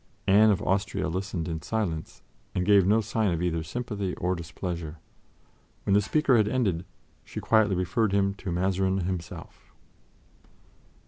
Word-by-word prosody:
Anne 105 Hz, +3 st, +6 dB
of 100 Hz, -, +1 dB
Austria 95 Hz, 0 st, 0 dB
listened 90 Hz, -1 st, -3 dB
in 80 Hz, -2 st, -4 dB
silence 85 Hz, -4 st, -3 dB, 0.3 s
and 90 Hz, -, 0 dB
gave 100 Hz, -3 st, +5 dB
no 110 Hz, +3 st, +4 dB
sign 110 Hz, -1 st, 0 dB
of 85 Hz, -, -1 dB
either 85 Hz, -2 st, 0 dB
sympathy 100 Hz, 0 st, -4 dB
or 90 Hz, +1 st, -1 dB
displeasure. 85 Hz, -1 st, -5 dB, 0.9 s
When 100 Hz, -, +1 dB
the 100 Hz, -, +5 dB
speaker 135 Hz, +3 st, +3 dB
had 105 Hz, -2 st, +3 dB
ended, 100 Hz, -8 st, 0 dB, 0.4 s
she -, -, -7 dB
quietly 110 Hz, -3 st, +3 dB
referred 100 Hz, +4 st, 0 dB
him 100 Hz, 0 st, +2 dB
to 95 Hz, -, -4 dB
Mazarin 95 Hz, +2 st, +1 dB
himself. 90 Hz, -2 st, -6 dB
95 Hz, 145 wpm, -27 LUFS, 90-105 Hz, 0.9 s, Anne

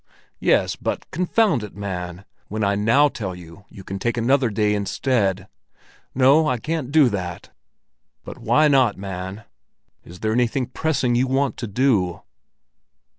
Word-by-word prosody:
"Yes; -, -, +2 dB
but, -, -, -4 dB
confound 180 Hz, -, +1 dB
it, 105 Hz, -, -9 dB
man, 90 Hz, -2 st, -6 dB, 0.2 s
when 110 Hz, +1 st, -3 dB
I 100 Hz, 0 st, +2 dB
now 115 Hz, +9 st, +4 dB
tell 100 Hz, -9 st, -5 dB
you 90 Hz, +3 st, -13 dB
you 95 Hz, -, -12 dB
can 95 Hz, +1 st, -6 dB
take 120 Hz, +3 st, -1 dB
another 130 Hz, +2 st, +2 dB
day 105 Hz, 0 st, +1 dB
instead!" 100 Hz, -2 st, 0 dB, 0.7 s
"No, 140 Hz, +5 st, +5 dB
I 125 Hz, -, +1 dB
can't 150 Hz, +1 st, -3 dB
do 150 Hz, -3 st, +5 dB
that." 90 Hz, -5 st, -5 dB, 0.7 s
"But -, -, -9 dB
why 155 Hz, 0 st, +3 dB
not, 130 Hz, -7 st, +3 dB
man? 95 Hz, +1 st, -6 dB, 0.6 s
Is 90 Hz, +1 st, -13 dB
there 110 Hz, 0 st, 0 dB
anything 125 Hz, +2 st, +1 dB
pressing 130 Hz, -1 st, -1 dB
you 125 Hz, +2 st, +2 dB
want 135 Hz, +1 st, 0 dB
to 120 Hz, -, -4 dB
do?" 100 Hz, -6 st, +1 dB
110 Hz, 150 wpm, -22 LUFS, 100-135 Hz, 0.7 s, No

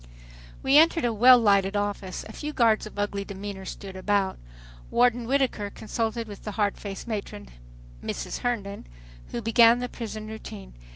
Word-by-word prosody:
We 275 Hz, +3 st, +6 dB
entered 330 Hz, -2 st, +4 dB
a 235 Hz, -, +1 dB
well 250 Hz, +4 st, +8 dB
lighted 200 Hz, -3 st, +3 dB
office. 205 Hz, -2 st, -3 dB
A -, -, -10 dB
few 300 Hz, 0 st, -5 dB
guards 225 Hz, -4 st, +3 dB
of 210 Hz, -, -13 dB
ugly 205 Hz, -1 st, -1 dB
demeanor 200 Hz, -1 st, -7 dB
stood 190 Hz, 0 st, -8 dB
about. 195 Hz, 0 st, 0 dB, 0.5 s
Warden 245 Hz, -1 st, +2 dB
Whittaker 260 Hz, -6 st, 0 dB
consulted 225 Hz, +2 st, -3 dB
with 205 Hz, -2 st, -10 dB
the 210 Hz, -, -5 dB
hard 205 Hz, -1 st, +1 dB
faced 200 Hz, +1 st, -7 dB
matron, 200 Hz, -, -5 dB, 0.5 s
Mrs. -, -, -4 dB
Herndon, 210 Hz, -5 st, -3 dB, 0.4 s
who 235 Hz, -, -5 dB
began 230 Hz, +1 st, +6 dB
the 250 Hz, 0 st, -3 dB
prison 220 Hz, -3 st, -6 dB
routine. 215 Hz, -2 st, -9 dB
215 Hz, 160 wpm, -26 LUFS, 200-235 Hz, 0.5 s, well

